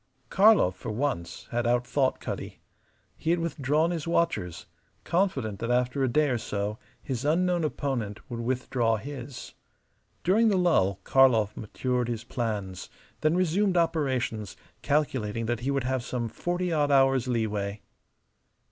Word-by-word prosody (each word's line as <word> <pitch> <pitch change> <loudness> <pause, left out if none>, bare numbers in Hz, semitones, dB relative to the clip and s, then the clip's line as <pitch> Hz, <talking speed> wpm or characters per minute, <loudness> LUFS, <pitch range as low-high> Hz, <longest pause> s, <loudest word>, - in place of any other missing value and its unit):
Karlov 200 - +5
for - - -7
once 110 -7 -3
had 120 0 0
outthought 125 +3 +1
Cutty. - - -6 0.6
He - - -3
had 170 - +4
withdrawn 160 -1 0
his 165 -2 -3
watchers, 165 - 0 0.4
confident 140 - 0
that 115 - -3
after 125 +2 +1
a - - +3
day 150 +4 +2
or 120 -3 0
so 105 0 -3 0.2
his 130 -2 -3
unknown 175 +3 +2
opponent 130 -9 -2
would 120 -1 -5
withdraw 120 -1 0
his. 130 +1 -8 0.7
During 220 +6 +4
the 200 -3 +3
lull 125 - +2
Karlov 115 -6 +4
matured 125 +3 -2
his 120 -2 -3
plans, 105 -6 -4 0.3
then 155 +2 +2
resumed 185 +2 +2
operations, 130 - 0 0.2
calculating 120 -7 0
that 120 0 -1
he 125 +3 -2
would 140 -2 0
have 130 -1 -1
some 120 -2 -3
forty 175 +6 -2
odd 145 -2 +2
hours' 135 -2 +4
leeway. 105 -4 -1
130 Hz, 140 wpm, -27 LUFS, 115-155 Hz, 0.7 s, Karlov